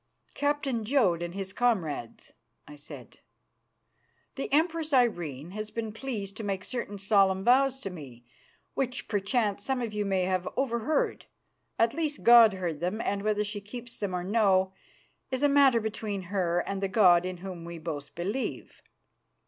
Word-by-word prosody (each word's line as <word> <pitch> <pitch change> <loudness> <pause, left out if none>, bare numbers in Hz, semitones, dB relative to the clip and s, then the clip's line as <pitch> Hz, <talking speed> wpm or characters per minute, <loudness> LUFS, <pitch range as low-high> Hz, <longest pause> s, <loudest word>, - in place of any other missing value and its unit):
"Captain 285 -5 -1
Jodd 215 -9 +2
and 175 +1 -5
his 190 -1 -5
comrades," 175 - -1 0.3
I 150 - -11
said, 145 0 -12 1.1
"the 270 - -5
Empress 320 +1 +1
Irene 175 - +1
has 215 +1 -5
been 225 -1 -4
pleased 220 -5 -5
to 225 - -6
make 195 -2 -2
certain 235 -4 -5
solemn 195 -1 +3
vows 265 +3 +4
to 195 - -5
me 130 -8 -11 0.5
which 255 -2 -2
perchance 205 0 0
some 265 +1 -1
of 230 -3 -3
you 210 0 -1
may 190 -2 0
have 185 0 -1
overheard. 265 +3 0 0.5
At 230 0 +3
least, 305 -1 -2
God 235 -3 +8
heard 175 -5 -3
them, 180 +6 -2
and 200 -3 -1
whether 210 0 +1
she 205 0 -5
keeps 235 +3 -8
them 195 -3 -2
or 180 - -2
no 190 -2 +2 0.6
is 260 +1 -2
a - - +6
matter 280 -4 +5
between 215 -2 -4
her 175 -3 +1
and 195 +1 -4
the 195 - +1
God 185 -4 +5
in 185 0 -4
Whom 180 -1 -8
we 170 0 -7
both 155 -3 -6
believe. 200 +10 -4
205 Hz, 165 wpm, -28 LUFS, 185-240 Hz, 1.1 s, God